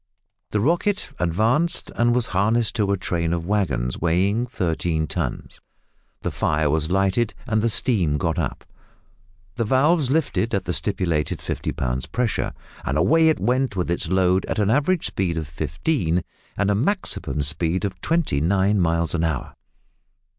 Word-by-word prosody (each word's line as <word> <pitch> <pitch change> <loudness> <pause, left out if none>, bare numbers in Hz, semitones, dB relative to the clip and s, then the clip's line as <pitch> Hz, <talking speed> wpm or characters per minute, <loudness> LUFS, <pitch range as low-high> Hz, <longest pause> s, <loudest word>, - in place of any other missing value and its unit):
The 105 - 0
"Rocket" 170 - 0
advanced, 110 - +1
and 120 0 +2
was 125 -2 +2
harnessed 110 +5 +1
to 100 -3 +1
a 100 - +1
train 85 -2 -1
of 85 -1 -2
waggons 75 -12 -1
weighing 95 +8 +1
thirteen 85 -7 -1
tons; - - -4 0.6
the - - -1
fire 75 -1 +1
was 80 0 0
lighted, 95 +4 +1
and 110 -3 +1
the 115 - +2
steam 100 - +3
got 80 0 -1
up. - - -3 0.9
The 115 - +1
valves 135 +5 +3
lifted 140 -7 0
at 100 - -2
the - - -1
stipulated 80 -4 -1
fifty - - -3
pounds 65 0 -2
pressure, 125 -2 -1 0.3
and 70 - -1
away 160 - +4
it 160 - +1
went 125 -2 0
with 90 -2 -1
its 85 - -2
load 95 +1 +2
at - - -2
an 105 0 +2
average 150 +7 +2
speed 90 -4 -1
of 80 -2 -3
fifteen, 80 - -1 0.3
and 100 0 +2
a - - +3
maximum 120 - 0
speed 85 +6 -1
of 95 -2 -5
twenty 160 - 0
nine 100 +4 +2
miles 85 -1 +1
an 85 -1 0
hour! 80 -6 -2
95 Hz, 160 wpm, -23 LUFS, 80-120 Hz, 0.9 s, away